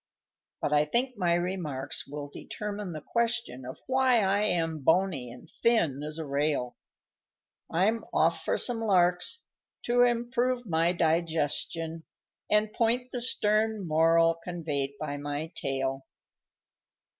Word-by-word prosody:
_ - - +3
_But - - -2
I 150 0 +4
think 250 - -1
my 175 -4 +2
remarks 170 -7 -1
will 145 +1 -6
determine 205 +6 -6
the 155 -2 -6
question, 230 - -1
Of 130 - -9
why 260 -3 +3
I 195 +2 +2
am 165 -5 0
bony 160 -4 +1
and 125 +7 -12
thin 170 - +1
as 150 +1 -4
a 160 - -4
rail; 140 -3 -1 0.9
I'm 215 +7 +1
off 165 0 +2
for - - 0
some 240 -2 +1
larks, 180 - +2 0.4
to 245 +1 +2
improve 245 +1 +1
my 165 -2 +2
digestion, 165 -1 -1 0.5
And 210 0 +2
point 245 +2 0
the 245 - -1
stern 215 -3 +2
moral 165 +1 +3
conveyed 150 -6 -3
by 145 -1 -4
my 145 +3 -4
tail. 135 -1 -3
170 Hz, 135 wpm, -28 LUFS, 150-220 Hz, 0.9 s, I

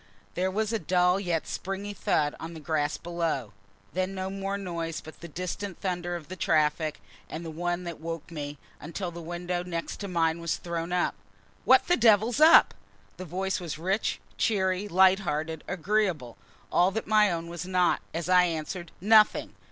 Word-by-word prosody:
There 185 +1 0
was 215 +3 -1
a 225 - +1
dull 180 +2 +2
yet 175 -5 -1
springy 195 +2 -4
thud 150 -5 +1
on 165 +1 -7
the - - -7
grass 150 0 -1
below. 165 -10 -2 0.4
Then 185 +1 -1
no 190 0 -3
more 195 0 -3
noise 170 -4 -4
but 155 - -12
the 170 - -7
distant 180 +3 -5
thunder 175 -2 -2
of 170 -3 -7
the 185 - -7
traffic, 155 -2 +1 0.3
and 165 +2 -6
the 165 - -5
one 175 +2 -2
that 170 -3 -6
woke 165 0 -6
me, 145 -2 -5 0.2
until 175 +3 -5
the 170 0 -8
window 175 +1 -3
next 170 +1 -5
mine 165 -2 +1
was 170 -1 -1
thrown 170 0 -4
up. 180 0 +1 0.5
"What 260 0 +6
the 355 - +4
devil's 225 +2 +4
up?" 315 +2 +8 0.4
The 185 - -6
voice 190 +4 -2
was 170 -4 -5
rich, 190 +6 -1 0.2
cheery, 190 -2 +1
light 190 0 +5
hearted, 160 -3 -3
agreeable; 180 - 0 0.4
all 180 +2 +4
that 215 +3 -3
my 215 -2 +4
own 165 -1 -3
was 175 +1 -6
not 180 -1 +2
as 165 +1 -3
I 180 -1 +6
answered 170 +1 -4
"Nothing!" 215 +2 +4
175 Hz, 175 wpm, -28 LUFS, 165-190 Hz, 0.5 s, up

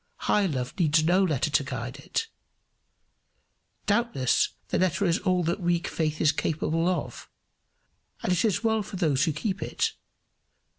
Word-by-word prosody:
High 205 -2 +3
love 130 -6 -3
needs 155 -2 +3
no 180 +4 +3
letter 155 -4 0
to 145 -1 +3
guide 130 0 -5
it. 185 - -3 1.6
Doubtless 205 - +2 0.2
the - - 0
letter 185 +2 +1
is 175 +2 +2
all 185 -2 +1
that 170 +4 -1
weak 175 -1 0
faith 155 -2 -2
is 155 - +4
capable 160 +2 0
of, 145 -10 -4 0.9
and - - 0
it 180 - +1
is 220 -1 +1
well 220 -1 +2
for 200 - -8
those 155 -6 +2
who 160 - +1
keep 195 +5 -3
it! - - -1
170 Hz, 155 wpm, -27 LUFS, 150-190 Hz, 1.6 s, is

